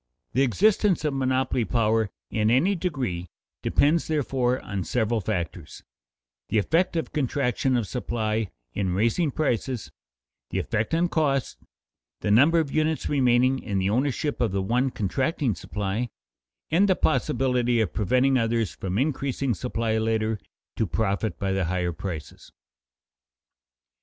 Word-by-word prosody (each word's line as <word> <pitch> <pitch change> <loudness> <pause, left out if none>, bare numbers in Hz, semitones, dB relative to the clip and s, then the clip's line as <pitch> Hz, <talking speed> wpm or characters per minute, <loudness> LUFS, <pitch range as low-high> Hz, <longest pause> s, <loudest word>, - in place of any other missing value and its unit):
The 130 - +2
existence 190 - +3
of 150 - +1
monopoly 130 -2 +1
power 110 -2 +1 0.2
in 110 -1 +1
any 135 - +3
degree 130 - -3 0.3
depends 155 +3 +2
therefore 130 -4 0
on 100 -2 -4
several 115 0 0
factors: 90 -5 -4 0.7
the - - +1
effect 165 - +2
of 165 - -2
contraction 130 -2 0
of 120 - 0
supply 110 -2 -2 0.2
in 95 -3 -1
raising 115 - +2
prices, 130 -4 -2 0.6
the - - -3
effect 110 +9 -1
on 170 +2 +2
costs, 140 -6 0 0.7
the 105 - 0
number 145 +10 +5
of 155 -4 +1
units 155 0 0
remaining 130 -1 +3
in 100 -5 -3
the 95 +1 +1
ownership 140 +4 0
of 115 -5 +2
the 95 0 -1
one 125 +6 +1
contracting 130 - -1
supply, 105 +5 -3 0.6
and 195 +5 +4
the 185 - +4
possibility 125 -7 +1
of 110 -6 0
preventing 130 +5 +2
others 115 -3 0
from 95 0 -3
increasing 135 -1 0
supply 115 0 -1
later 110 -1 0 0.4
to 110 - +1
profit 100 +5 -1
by 100 -1 -1
the 95 -1 0
higher 90 0 -1
prices. 80 -3 -7
120 Hz, 135 wpm, -25 LUFS, 105-140 Hz, 0.7 s, number